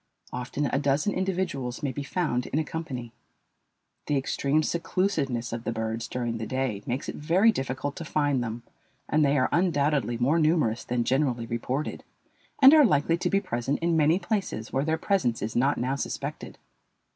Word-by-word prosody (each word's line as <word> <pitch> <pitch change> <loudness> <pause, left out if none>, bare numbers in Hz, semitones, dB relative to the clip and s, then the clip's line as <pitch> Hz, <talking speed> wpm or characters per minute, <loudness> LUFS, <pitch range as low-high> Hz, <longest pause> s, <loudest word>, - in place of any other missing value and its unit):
Often 125 +4 -2
a 135 - +3
dozen 145 +7 +1
individuals 180 -10 -2
may 140 - 0
be 145 - -5
found 140 -5 -1
in - - -2
a 160 - +2
company. 135 -7 -6 0.9
The 145 - +1
extreme 140 +3 +1
seclusiveness 160 -9 -1
of 115 0 -4
the - - -2
birds 110 0 -3
during 120 -2 -3
the 110 - -4
day 130 -6 -2
makes 125 +2 -2
it - - -3
very 180 +9 +3
difficult 135 - -3
to - - -5
find 145 -5 +1
them, 115 0 -5 0.4
and 155 0 +2
they 145 0 +3
are 130 - +3
undoubtedly 145 - +1
more 140 +8 +2
numerous 155 -8 +2
than 120 -1 -1
generally 130 -2 +1
reported, 125 +5 -3 0.6
and 270 +3 +10
are 310 -1 +8
likely 165 - +2
to - - 0
be 195 - +3
present 120 +1 -2
in 170 0 0
many 160 +2 +4
places 190 - -3
where 135 - +1
their 160 0 +1
presence 160 - 0
is 110 - -4
not 135 +4 +2
now 130 +3 -1
suspected. 140 - -5
140 Hz, 180 wpm, -27 LUFS, 120-160 Hz, 0.9 s, and